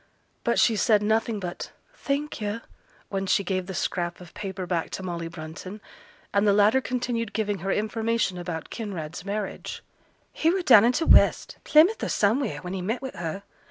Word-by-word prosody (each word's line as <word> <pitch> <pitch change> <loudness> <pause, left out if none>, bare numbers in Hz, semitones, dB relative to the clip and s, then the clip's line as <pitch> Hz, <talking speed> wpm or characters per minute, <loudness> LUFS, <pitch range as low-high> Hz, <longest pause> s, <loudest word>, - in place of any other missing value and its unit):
But - - +1
she 230 - +4
said 210 0 +3
nothing 220 0 +1
but 180 -2 -6 0.2
'Thank 290 - -3
yo',' 210 +2 -3 0.5
when 195 -1 -2
she 200 - +2
gave 185 -1 -2
the 190 - -5
scrap 175 -1 -2
of 175 -2 -13
paper 190 -2 -5
back 175 -2 -1
to 190 - -8
Molly 170 -2 -4
Brunton. 165 +5 -8 0.5
And 200 +1 +3
the 200 - +5
latter 210 +6 +4
continued 240 -4 -2
giving 205 -2 -1
her 195 +3 -2
information 220 -2 0
about 175 -2 -5
Kinraid's 180 -8 -5
marriage. 200 +1 -5 0.5
'He 320 - +2
were 370 +1 +1
down 230 -8 +8
in 240 - +5
t' 325 +5 0
west, - - +4
Plymouth 330 +9 +5
or - - -1
somewheere, 220 +4 +1
when 180 +1 -5
he 190 - -3
met 225 +8 -2
wi' 265 - -4
her. 175 +2 -5
205 Hz, 185 wpm, -26 LUFS, 180-230 Hz, 0.5 s, down